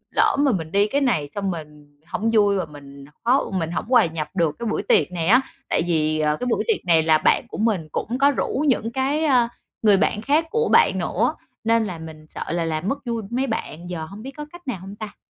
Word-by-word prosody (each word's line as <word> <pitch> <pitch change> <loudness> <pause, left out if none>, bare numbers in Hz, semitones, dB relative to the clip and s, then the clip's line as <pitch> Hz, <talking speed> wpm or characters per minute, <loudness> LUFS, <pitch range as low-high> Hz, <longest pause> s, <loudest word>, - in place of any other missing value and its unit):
lỡ - - +4
mà 285 -2 +4
mình 165 -5 -3
đi 200 +1 +3
cái 285 +5 0
này 155 - +1
xong 195 0 -2
mình 150 -3 -10
hông 225 0 -1
vui 205 -2 +4
và 180 - -1
mình 140 -2 -12 0.2
khó 250 0 +2
mình 170 -3 -2
hổng 175 - -3
hòa 250 - +6
nhập 160 -2 -4
được 165 -4 +1
cái 235 - -4
buổi 215 - -1
tiệc 200 - +3
này 170 -2 -2
á, 250 +7 +6 0.3
tại - - +2
vì, 155 -2 +1
ờ, 150 0 +1
cái 250 - -2
buổi 240 - +1
tiệc 440 - 0
này 165 -2 +4
là 160 -1 +5
bạn - - +2
của - - -8
mình 205 -7 0
cũng 245 +3 -2
có 280 +1 +5
rủ 280 +1 -1
những 230 -3 +1
cái, 275 +5 0
ờ, 250 -5 +4 0.3
người 210 -3 +5
bạn 210 +2 +1
khác 300 +6 +2
của 460 0 +1
bạn - - +5
nữa - - 0 0.3
nên 225 0 +3
là 175 -4 -5
mình 160 -1 -10
sợ - - -6
là 170 -1 0
làm 160 +3 -2
mất 275 +3 -3
vui 230 -2 -2
mấy 260 +3 -1
bạn, 175 - -5
giờ 165 -3 -4
hông 200 +6 -10
biết 270 - -6
có 300 - -5
cách 350 -3 -14
nào 245 - -2
hông 195 +2 -9
ta? 215 -1 -8
200 Hz, 250 wpm, -22 LUFS, 160-245 Hz, 0.3 s, hòa